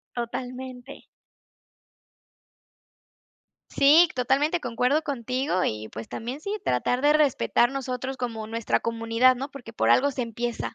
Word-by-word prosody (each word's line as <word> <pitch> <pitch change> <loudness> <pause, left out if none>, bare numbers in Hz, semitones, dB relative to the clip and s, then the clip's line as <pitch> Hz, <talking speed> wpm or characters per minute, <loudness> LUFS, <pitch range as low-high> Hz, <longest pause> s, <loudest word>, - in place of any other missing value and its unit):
Totalmente. 250 +2 -6 2.7
Sí, 315 +5 +6
totalmente 280 +7 +1
concuerdo 250 +4 0
contigo 255 -6 -2
y, 110 0 -3
pues, 110 +1 -8
también 245 +6 -6
sí, 400 +6 -3
tratar 245 - 0
de 295 +1 +5
respetar 285 -4 +2
nosotros 265 -1 -4
como 230 -3 -4
nuestra 230 0 -1
comunidad, 230 +2 +2
¿no?, 270 +3 -5
porque 245 -5 -11
por - - +1
algo 285 +2 +4
se 255 -2 -3
empieza. 235 0 -4
250 Hz, 125 wpm, -25 LUFS, 230-275 Hz, 2.7 s, Sí